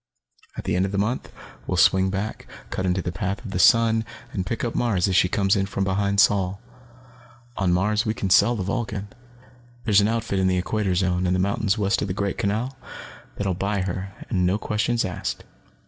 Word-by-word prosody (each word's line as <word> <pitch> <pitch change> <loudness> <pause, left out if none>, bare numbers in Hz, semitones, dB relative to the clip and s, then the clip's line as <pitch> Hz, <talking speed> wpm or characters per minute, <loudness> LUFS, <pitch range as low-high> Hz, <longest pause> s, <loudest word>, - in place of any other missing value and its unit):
"At - - -4
the - - -1
end 90 +1 +2
of - - -6
the 100 - -2
month, 110 +6 -1 0.4
we'll - - -1
swing 95 0 +4
back, 100 +3 -4 0.2
cut 95 - -2
into 90 0 0
the 90 - -2
path 100 +7 -4
of 100 - -6
the 90 - -2
sun, 115 +2 +5 0.3
and 95 -2 -3
pick 115 - -3
up 120 - -1
Mars 105 -7 +1
as 95 - 0
she 90 - +4
comes 100 0 +2
in 95 -1 0
from 100 0 -2
behind 100 +1 0
Sol. 100 -3 +3 1.0
"On 95 -3 +1
Mars, 105 +4 +2
we 110 -2 -1
can 95 -4 -2
sell 115 +5 +5
the 100 - -3
Vulcan. 100 0 -3 0.8
There's 105 -3 +5
an 100 - +2
outfit 115 -3 -1
in 95 - +2
the 90 0 +2
Equator 95 +1 -1
Zone, 90 0 +1
in 90 - +1
the - - +1
mountains 100 +2 0
west 100 -1 +1
of - - -1
the 90 - -3
Great 100 -1 -2
Canal, 110 +7 -1 0.6
that 100 - -3
will 95 - +1
buy 100 +2 -1
her 95 +1 -4
and 90 -2 0
no 90 +3 +2
questions 110 +2 0
asked. 90 -1 -4
100 Hz, 215 wpm, -24 LUFS, 95-105 Hz, 1.0 s, sun